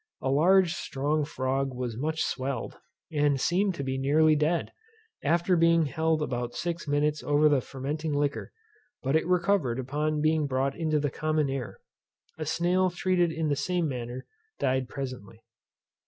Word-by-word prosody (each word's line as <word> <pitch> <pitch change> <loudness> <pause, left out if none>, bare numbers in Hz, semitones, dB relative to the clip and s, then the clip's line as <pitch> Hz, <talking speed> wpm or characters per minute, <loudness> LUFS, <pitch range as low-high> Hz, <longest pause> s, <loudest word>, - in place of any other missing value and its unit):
A 130 - -1
large 175 +4 +4
strong 150 -1 -1
frog 135 -1 -2
was 125 -3 -3
much 155 +6 -1
swelled, 130 -2 -3 0.4
and 145 -2 +2
seemed 185 +6 +1
to 140 - -4
be 135 0 -2
nearly 155 +3 +4
dead, 155 +3 0 0.5
after 175 +2 +2
being 165 -1 +4
held 160 +2 0
about 120 -3 -3
six 170 -2 -3
minutes 145 +1 +1
over 145 +1 +3
the 145 -3 +3
fermenting 145 +5 -4
liquor; 145 0 -1 0.5
but 135 +3 +1
it 160 - +2
recovered 180 -8 +2
upon 150 +4 -1
being 155 -1 +2
brought 135 +1 0
into 155 -2 0
the 145 -2 -1
common 155 -1 0
air. 135 -4 -5 0.6
A 155 - -3
snail 180 +3 +2
treated 175 -1 +1
in 160 -1 -1
the 145 - +2
same 175 +4 0
manner 125 -1 -5 0.3
died 130 -1 0
presently. 125 -5 -7
150 Hz, 155 wpm, -28 LUFS, 135-160 Hz, 0.6 s, large